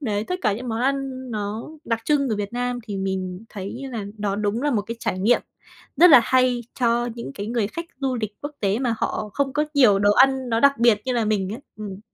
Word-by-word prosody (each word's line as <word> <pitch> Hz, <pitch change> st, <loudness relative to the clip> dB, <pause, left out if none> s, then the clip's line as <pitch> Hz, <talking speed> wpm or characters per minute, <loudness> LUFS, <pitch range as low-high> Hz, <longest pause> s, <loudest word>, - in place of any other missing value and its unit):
đấy, 215 Hz, -6 st, -1 dB
tất 365 Hz, -, -3 dB
cả 210 Hz, -4 st, +2 dB
những 240 Hz, +4 st, -5 dB
món 225 Hz, +1 st, -2 dB
ăn 265 Hz, -1 st, -2 dB
nó 210 Hz, +2 st, -4 dB, 0.2 s
đặc 230 Hz, -1 st, -1 dB
trưng 280 Hz, -3 st, +2 dB
ở 215 Hz, -, 0 dB
Việt 205 Hz, +1 st, -4 dB
Nam 245 Hz, 0 st, -2 dB
thì 205 Hz, -3 st, -5 dB
mình 190 Hz, +1 st, -3 dB
thấy 205 Hz, +6 st, -7 dB
là 215 Hz, -4 st, -4 dB
nó 200 Hz, -1 st, -1 dB
đúng 210 Hz, +4 st, -1 dB
là 295 Hz, -, +1 dB
một 210 Hz, -5 st, +1 dB
cái 230 Hz, +3 st, -6 dB
trải 185 Hz, -, -2 dB
nghiệm 220 Hz, +6 st, +3 dB, 0.6 s
rất 355 Hz, 0 st, +8 dB
là 265 Hz, -4 st, +10 dB
hay 255 Hz, -1 st, +3 dB, 0.2 s
cho 240 Hz, 0 st, +2 dB
những 235 Hz, -, -7 dB
cái 205 Hz, -, -5 dB
người 230 Hz, -3 st, 0 dB
khách 335 Hz, +10 st, -6 dB, 0.2 s
du 265 Hz, -2 st, 0 dB
lịch 210 Hz, -1 st, -5 dB
quốc 290 Hz, +1 st, -6 dB
tế, 200 Hz, +2 st, +1 dB
mà 245 Hz, -3 st, 0 dB
họ 210 Hz, -, -2 dB
không 275 Hz, -2 st, 0 dB
có 300 Hz, 0 st, +1 dB
nhiều 230 Hz, -8 st, +6 dB
đồ 205 Hz, +1 st, +4 dB
ăn 265 Hz, +1 st, +4 dB
nó 225 Hz, 0 st, +1 dB
đặc 280 Hz, -2 st, +4 dB
biệt 235 Hz, -3 st, +4 dB
như 255 Hz, -, -1 dB
là 235 Hz, -2 st, +1 dB
mình 205 Hz, -2 st, 0 dB
ấy. 230 Hz, -, -5 dB, 0.2 s
Ừm. 205 Hz, -2 st, -7 dB
230 Hz, 245 wpm, -23 LUFS, 205-260 Hz, 0.6 s, là